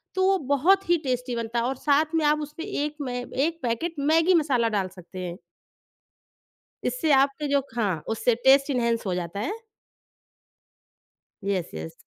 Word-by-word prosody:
तो 375 - +2
वो 390 - +4
बहुत 360 +7 +3
ही 345 - +5
टेस्टी 250 -2 -2
बनता 230 0 -2
है 235 - 0
और 265 - -1
साथ 295 +4 +1
में 315 - +2
आप 300 +1 +3
उसमें 300 +4 -7
एक 300 -7 -3
मैं 245 -2 -3
एक 320 +7 -1
पैकेट 245 +9 -2
मैगी 320 +5 +3
मसाला 245 -6 +1
डाल 190 -2 0
सकते 180 +1 -10
हैं। 175 -1 -5 1.5
इससे 320 -12 +1
आपके 275 +2 +2
जो 280 0 +3 0.2
हाँ, 195 -9 0
उससे 225 +2 +1
टेस्ट 275 +2 +6
इनहैंस 235 -4 0
हो 185 - 0
जाता 180 +2 -4
है। 235 - -2 1.9
Yes 195 -4 -1
yes. 80 +1 -6
265 Hz, 165 wpm, -25 LUFS, 225-300 Hz, 1.9 s, टेस्ट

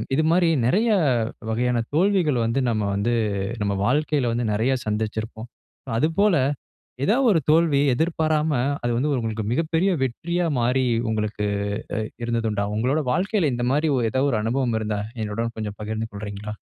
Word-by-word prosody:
இதுமாரி 165 +3 +3 0.2
நெறைய 210 - +2 0.6
வகையான 120 +1 +1
தோல்விகள் 170 - +2
வந்து, 115 +4 0
நம்ம 110 -1 -1
வந்து 110 +4 0 0.5
நம்ம 100 -1 0
வாழ்க்கையில 145 -1 +1
வந்து 115 -2 -1
நெறைய 120 +6 +1
சந்திச்சிருப்போம். 110 +2 -3 0.5
அதுபோல 170 - +3 0.7
ஏதாவது 250 - +3
ஒரு 170 - +4
தோல்வி 155 -2 +4
எதிர்பாராம, 155 +1 +1 0.3
அது 120 - 0
வந்து 135 +6 0
உங்களுக்கு 110 -2 -2
மிகப்பெரிய 165 +6 +1
வெற்றியா 170 +8 -1
மாறி, 125 +2 +2 0.2
உங்களுக்கு 105 -1 -2 0.5
அ - - 0 0.3
இருந்தது 115 -1 -1
உண்டா? 100 -1 -1
உங்களுடைய 135 +6 0
வாழ்க்கையில 185 - +1
இந்த 120 0 -1
மாரி 150 +2 +2
ஓ - - +1
ஏதாவது 135 +2 +1
ஒரு 110 - +1
அனுபவம் 120 -1 0
இருந்தா, 105 -1 -2 0.2
என்னுடன் 115 +2 -3
கொஞ்சம் 105 -2 -5
பகிர்ந்து 110 +1 -3
கொள்றீங்களா? 105 +1 -6
125 Hz, 145 wpm, -23 LUFS, 110-160 Hz, 0.7 s, ஒரு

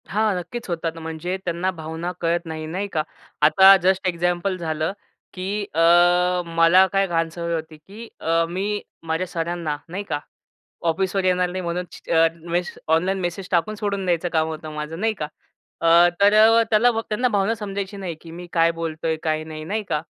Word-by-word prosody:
हां, 215 0 +1
नक्कीच 230 +8 -6
होतात, 165 -1 -3
म्हणजे 165 +3 -4
त्यांना 175 +2 -1
भावना 165 +1 -5
कळत 170 +1 0
नाही 160 -1 -5
नाही 190 +5 -3
का. 155 -2 +1 0.4
आता 190 +6 +8
जस्ट 190 +1 +2
एक्झाम्पल 175 +2 0
झालं, 160 0 -2 0.4
की 200 +2 -3
अ, 160 - -1 0.7
मला 165 +3 +5
काय 195 0 +3
घाण 165 -2 0
सवय 170 0 -4
होती, 160 -1 -6
की 205 +9 -12
अ, 165 +1 +1
मी 200 +4 -2 0.3
माझ्या 165 +3 -1
सरांना 165 -3 -3
नाही 190 +4 -4
का, 145 -7 -3 0.7
ऑफिसवर 190 +3 0
येणार 180 -1 +2
नाही 185 +1 -4
म्हणून 175 +1 -2
छ - - -14
अ, 165 0 +5 0.2
मेस 175 +1 -1
ऑनलाईन 180 +5 +2
मेसेज 175 +1 -3
टाकून 185 +4 +1
सोडून 200 -2 -2
द्यायचं 175 0 0
काम 160 -1 +2
होतं 155 -1 -6
माझं 150 +2 -5
नाही 220 +1 +1
का. 155 -7 -5 0.5
अ, 170 +1 +6
तर 205 +1 +6
अ, 225 +2 +6
त्याला 230 +3 +4 0.2
त्यांना 225 +4 +1
भ - - -8
भावना 205 +2 +1
समजायची 200 -1 -5
नाही, 185 -4 -5
की 165 - -11
मी 175 +1 -9
काय 165 0 +4
बोलतोय 165 -1 -3
काय 155 -1 0
नाही 155 -1 -8
नाही 210 +5 -2
का. 150 - 0
175 Hz, 185 wpm, -22 LUFS, 165-195 Hz, 0.7 s, आता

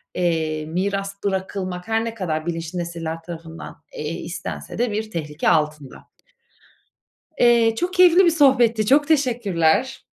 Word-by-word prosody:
eee, 160 -3 -1
miras 195 +4 -2
bırakılmak, 190 -1 -3
her 225 0 0
ne 230 - -4
kadar 160 -7 -3
bilinçli 165 +1 -4
nesiller 165 -1 -5
tarafından, 165 -1 -9 0.2
eee, 150 +1 -5
istense 170 +1 -7
de 240 0 0
bir 215 +1 -4
tehlike 150 -2 -2
altında. 150 -3 -1 1.3
Eee, 235 -2 +4
çok 350 +9 -2
keyifli 365 0 +6
bir - - +6
sohbetti. 245 -8 +3
Çok 285 +5 +4
teşekkürler. 240 - +1
190 Hz, 130 wpm, -22 LUFS, 165-235 Hz, 1.3 s, keyifli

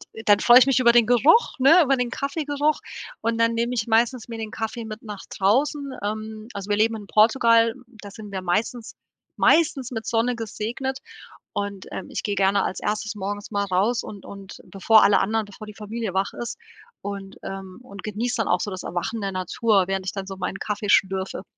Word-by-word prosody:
d 220 - -8
dann, 205 -1 +5
freue 240 0 +7
ich 255 - +5
mich 270 -1 +2
über 235 -2 +6
den 235 -1 +5
Geruch, 260 - +4
ne 320 +7 +7
über 275 -2 +2
den 250 -1 -1
Kaffeegeruch 290 +2 -1 0.4
und 230 0 -1
dann 230 0 +3
nehme 235 +2 -1
ich 215 -3 -1
meistens 230 +1 +1
mir 230 -1 -7
den 220 -1 -5
Kaffee 225 +1 -4
mit 215 +1 -8
nach 210 -3 -8
draußen. 275 +8 0
Ähm, 215 +1 -5
also, 200 0 -7
wir 205 - +2
leben 225 +1 +2
in 210 - -8
Portugal, 230 +1 +4 0.3
da 205 - -9
sind 210 -1 -10
wir 190 - -4
meistens 215 +6 -2 0.4
meistens 285 -6 +3
mit 225 -2 -5
Sonne 235 +2 +1
gesegnet 235 +4 -4 0.6
und, 200 -1 -4
ähm, - - -6
ich - - -4
gerne 200 -1 +1
als - - -3
erstes 215 +1 -2
morgens 205 +2 -5
mal 200 -1 0
raus 200 +6 +1
und 200 -3 -10
und 200 -1 -10
bevor 215 +3 +4
alle 200 - +5
Anderen 220 +1 0
bevor 205 +1 -12
die 210 - -9
Familie 215 -1 -5
wach 195 +1 0
ist 240 - -6 0.4
und, 200 -1 -7
ähm 195 +1 -8
und 200 -5 -11
genieß 225 +4 -2
dann 225 - -1
auch 180 - +2
so 205 - -3
das 185 - -6
Erwachen 210 +6 -3
der 195 -1 -2
Natur, 190 +2 +1
während 195 -1 -2
ich 190 - -2
dann 195 -1 -5
so 195 - -6
meinen 190 +1 -4
Kaffee 210 -1 -3
schlürfe. 190 -1 +1
215 Hz, 205 wpm, -23 LUFS, 200-235 Hz, 0.6 s, freue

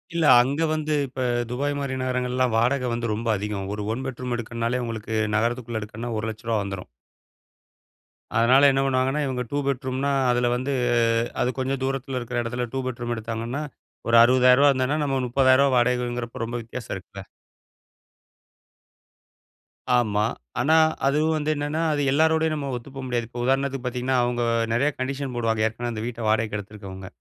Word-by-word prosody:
இல்ல. 165 - +1 0.2
அங்க 140 +5 -2
வந்து 155 0 -1
இப்ப 130 0 -4 0.3
துபாய் 145 +3 -1
மாதிரி 140 -2 -3
நகரங்கள்லாம் 125 -1 0
வாடக 125 +3 +2
வந்து 115 -1 -2
ரொம்ப 115 +2 -4
அதிகம். 100 -1 -4
ஒரு 105 - -4
1 130 +3 -4
பெட்ரூம் 125 -1 -4
எடுக்கணும்னாலே, 115 +2 -2
உங்களுக்கு 110 -1 -5 0.2
நகரத்துக்குள்ள 115 0 -1
எடுக்கணுன்னா 115 +3 -5
ரூ.1,00,000 110 +1 -2
வந்துரும். 95 -2 -6 1.5
அதனால 130 +5 +6
என்ன 135 0 +1
பண்ணுவாங்கன்னா, 135 +2 +1
இவங்க 125 -1 -2
2 145 - -1
பெட்ரூம்னா, 130 +1 -1 0.2
அதில 120 0 +2
வந்து 130 +3 -2 0.7
அது 125 - +2
கொஞ்சம் 135 +1 -1
தூரத்தில 135 -1 -2
இருக்கிற 120 0 -3
இடத்துல 120 +1 -3
2 135 - -1
பெட்ரூம் 120 -1 -3
எடுத்தாங்கன்னா 115 +5 -4 0.5
ஒரு 120 - +4
ரூ.60,000 125 +3 +6
இருந்ததுனா 135 +2 0
நம்ம 135 -2 0
ரூ.300,000 130 +2 +4
வாடகைங்கிறப்போ 120 -1 0
ரொம்ப 120 +1 -4
வித்தியாசம் 115 0 -7
இருக்குல்ல. 100 +1 -9 2.8
ஆமா. 105 -3 +1 0.4
ஆனா, 155 +5 +3 0.3
அது 140 +2 +2 0.2
வந்து 155 0 -1
என்னென்னா, 145 +2 -2
அது 145 - 0
எல்லாரோடையும் 160 +2 +3
நம்ம 140 -2 -4
ஒத்து 120 +3 -8
போ 135 - -5
முடியாது. 120 -2 -1
இப்போ 120 0 -6
உதாரணத்துக்கு 135 0 0
பாத்தீங்கன்னா, 125 +1 0
அவுங்க 120 0 -1 0.3
நெறைய 135 +6 +2
கண்டிஷன் 135 0 -3
போடுவாங்க. 115 -2 +1
ஏற்கனவே 120 +2 -4
அந்த 110 -1 -4
வீட்ட 120 -1 -6
வாடகைக்கு 110 -1 +1
எடுத்திருக்கவுங்க. 100 -2 -9
125 Hz, 150 wpm, -24 LUFS, 115-135 Hz, 2.8 s, அதனால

